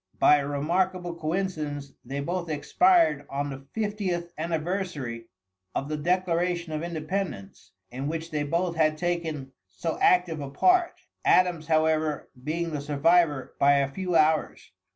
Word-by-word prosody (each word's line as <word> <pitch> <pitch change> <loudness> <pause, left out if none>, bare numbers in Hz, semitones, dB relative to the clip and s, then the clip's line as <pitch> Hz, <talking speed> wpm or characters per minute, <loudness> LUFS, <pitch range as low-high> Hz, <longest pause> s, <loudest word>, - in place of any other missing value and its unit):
By 150 - +6
a 140 -1 -2
remarkable 175 +5 0
coincidence, 155 -5 -3
they 135 +3 -4
both 175 +3 -3
expired 325 - +3
on 140 +1 -2
the 135 0 -9
fiftieth 195 -6 -2
anniversary 160 -7 -3 0.5
of 140 - -2
the 155 - -1
Declaration 175 0 0
of 155 - -2
Independence, 170 - -4 0.2
in 130 +3 -4
which 165 +1 -4
they 150 -1 -1
both 170 +4 -1
had 155 -1 +2
taken 160 -6 -2 0.2
so 95 - -4
active 180 -3 +3
a 140 - -5
part, 360 - +2 0.2
Adams, 175 -4 +3
however, 155 -1 +1
being 165 +3 -2
the 150 -2 -3
survivor 145 -1 +2
by 140 +1 +6
a 140 -1 +2
few 180 +3 -2
hours. 155 0 +2
160 Hz, 140 wpm, -27 LUFS, 145-175 Hz, 0.5 s, By